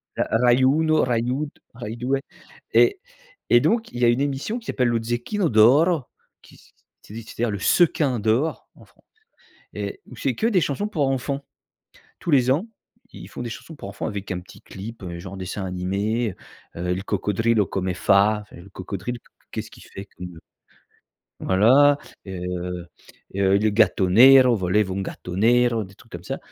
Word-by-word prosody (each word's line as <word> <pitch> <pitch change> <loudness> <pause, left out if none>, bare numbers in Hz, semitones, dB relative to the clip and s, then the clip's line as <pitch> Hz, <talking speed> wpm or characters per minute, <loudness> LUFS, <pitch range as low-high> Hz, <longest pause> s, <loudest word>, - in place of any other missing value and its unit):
ra - - -1
rai 125 +1 +4
uno, 155 +4 +3
rai 120 -2 +1
du 125 +2 -1 0.4
rai 115 -2 -7
due 120 - -5 0.7
ret 395 -1 +4 0.5
et 120 - +7
donc 225 +7 0
il 120 - -7
y - - +5
a - - +5
une 120 +3 +1
émission 145 - -2
qui 230 - -19
s'appelle 125 -2 0
le 115 -1 0
Zecchino 120 - -1
d'oro 140 +9 +5 0.4
qui - - -18 0.4
c'est - - -14
c'est-à-dire 115 0 -3
le 100 - -4
sequin 140 - +2
d'or 115 +9 0
en - - -17
Français - - -29 0.7
et 390 - -5
où - - -12
c'est - - -2
que 225 - 0
des 190 -7 +2
chansons 155 +10 -1
pour 155 -10 0
enfants. 135 +1 -2 0.8
Tous 170 - -3
les 130 -3 +4
ans, 165 +11 0 0.5
ils - - -10
font - - -8
des 120 - -5
chansons 160 - -10
pour 120 - -9
enfants 100 - -5
avec 100 -1 -5
un 90 - -2
petit 90 - -15
clip, 110 +3 -9
heu, 85 -1 -6
genre 95 +2 -8
dessin 95 +1 -5
animé, 100 +4 -2 0.4
heu, 90 +1 -3
«Il 95 - -5
coccodrillo 110 +2 +1
come 95 -1 -2
Fa», 100 +4 +3
enfin - - -17
le 85 +3 -13
crocodile 100 +5 -6 0.3
qu'est - - -3
ce - - -13
qui - - -15
fait 95 - -10
que 90 - -13 1.2
voilà, 135 +9 +5 0.3
heu 90 -1 -5 0.5
heu, 100 0 +3
le 110 +1 +2
gatto 100 -3 +2
nero, 125 +3 +7
volevo 95 0 0
un 100 - -2
gatto 90 -1 -7
nero, 120 +1 +3
des 95 +1 -15
trucs - - -21
comme - - -8
ça - - -4
115 Hz, 180 wpm, -23 LUFS, 95-135 Hz, 1.2 s, et